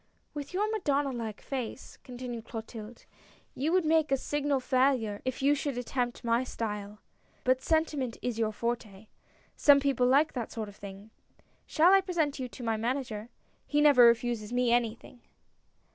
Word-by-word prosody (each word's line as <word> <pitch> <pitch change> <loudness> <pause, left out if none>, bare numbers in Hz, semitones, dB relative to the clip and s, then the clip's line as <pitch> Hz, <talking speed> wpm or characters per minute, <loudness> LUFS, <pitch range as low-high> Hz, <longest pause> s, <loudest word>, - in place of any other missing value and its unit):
" - - -44
With 290 -1 -6
your 400 +4 0
Madonna 290 -10 0
like 225 -4 -5
face," 265 -2 -6
continued 245 -2 -7
Clotilde, 225 0 -8 0.3
" - - -31
you 295 +5 -1
would 365 -2 +2
make 315 -2 +2
a 270 - +4
signal 290 0 -1
failure 255 -5 +1
if 255 +1 -3
you 285 +1 +5
should 285 -2 -2
attempt 245 0 -3
my 235 +1 +2
style; 210 -4 -5 0.5
but 255 0 +2
sentiment 300 -7 0
is 240 -2 -3
your 220 -1 +1
forte. 215 -2 -4 0.5
Some 285 -1 +6
people 275 -3 +1
like 280 +5 +3
that 240 -4 -4
sort 220 -2 -5
of 200 - -14
thing. 200 +1 -11 0.6
Shall 345 +4 +5
I 390 - +6
present 330 -7 -1
you 255 - -3
to 245 - -10
my 225 -1 0
Manager. 235 -2 -3 0.4
He 295 - +1
never 285 -5 +7
refuses 235 -2 +1
me 245 -1 +1
anything 240 0 -1
250 Hz, 170 wpm, -29 LUFS, 230-285 Hz, 0.6 s, never